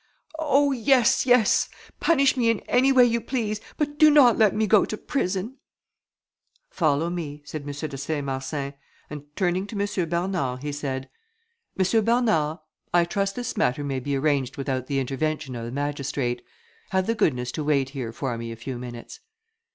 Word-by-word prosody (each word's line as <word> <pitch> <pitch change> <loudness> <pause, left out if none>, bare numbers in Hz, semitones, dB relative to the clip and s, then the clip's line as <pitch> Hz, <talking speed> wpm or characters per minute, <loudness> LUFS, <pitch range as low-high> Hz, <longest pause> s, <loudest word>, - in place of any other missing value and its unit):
"Oh! 285 -2 +3
yes! 260 0 +3
yes! 245 -4 +4 0.3
Punish 275 -5 +3
me 240 -3 +2
in 230 -3 +1
any 260 +2 +3
way 255 -2 +7
you 235 -1 +1
please, 215 -5 -2 0.2
but 295 -1 -2
do 310 - +8
not 280 -6 +6
let 215 -4 +3
me 220 - +2
go 210 -1 +5
to 215 - -4
prison." 205 +1 -2 1.1
"Follow 160 0 +1
me," 150 -4 -5
said 155 +1 -6
M. 140 - -11
de 145 0 -5
Saint 145 0 -3
Marsin; 135 +1 -3 0.4
and 150 -1 -6
turning 185 0 0
to 205 -1 -5
M. 200 -4 -1
Bernard, 170 -7 -1
he 145 - -3
said, 135 -2 -4 0.7
"M. 210 +4 +3
Bernard, 215 -10 +2 0.3
I 175 -1 +4
trust 195 +2 -1
this 245 -1 -4
matter 145 - +1
may 135 -2 -2
be 140 +2 -2
arranged 140 -1 0
without 130 -2 -2
the 140 - -1
intervention 135 0 -2
of 115 -1 -5
the 120 - -6
magistrate; 140 -3 -2 0.5
have 190 -1 +1
the 230 - +1
goodness 125 - 0
to 155 - -4
wait 140 -3 +1
here 130 -5 -5
for 120 0 -4
me 115 0 -5
a - - -6
few 120 +2 -6
minutes." 120 - -9
160 Hz, 175 wpm, -25 LUFS, 135-220 Hz, 1.1 s, do